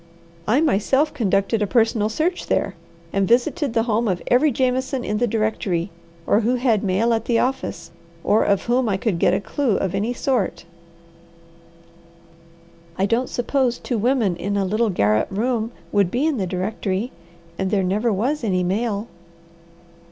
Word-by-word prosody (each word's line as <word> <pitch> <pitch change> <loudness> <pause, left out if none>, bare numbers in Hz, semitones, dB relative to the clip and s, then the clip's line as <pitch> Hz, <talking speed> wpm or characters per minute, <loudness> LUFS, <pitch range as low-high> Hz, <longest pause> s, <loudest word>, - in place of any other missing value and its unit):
"I 245 +8 +3
myself 275 +1 +2
conducted 210 -3 +1
a 210 - +1
personal 225 -2 +2
search 335 +10 -1
there, 195 - 0 0.4
and 195 -1 +1
visited 245 +3 +1
the 225 - +3
home 230 0 0
of 185 -3 0
every 265 +5 +4
Jameson 260 +1 0
in 210 -2 -2
the 245 - +2
directory 205 -5 -1 0.3
or 205 - +3
who 235 +3 +1
had 240 -5 +1
mail 210 +5 +2
at 225 0 -1
the 235 - +2
office 255 -9 -2 0.3
or 215 - +3
of 200 -1 +1
whom 245 0 +1
I 195 - +1
could 190 -4 -1
get 180 - +3
a - - 0
clue 235 +2 -1
of 190 - -2
any 215 +5 -1
sort." 245 - -1 2.3
"I 190 - +2
don't 230 +5 0
suppose 245 0 0
two 240 -4 -3
women 230 -5 +1
in 200 +3 -2
a 195 - +1
little 215 +4 +1
garret 105 - +2
room 225 +2 -1 0.2
would 200 -3 +2
be 250 +9 0
in 315 -4 +1
the 190 -4 -1
directory, 190 +4 -2 0.5
and 190 0 0
there 195 -1 +1
never 210 +6 +1
was 250 +9 -1
any 185 -4 +1
mail." 205 +3 -1
220 Hz, 165 wpm, -22 LUFS, 195-245 Hz, 2.3 s, every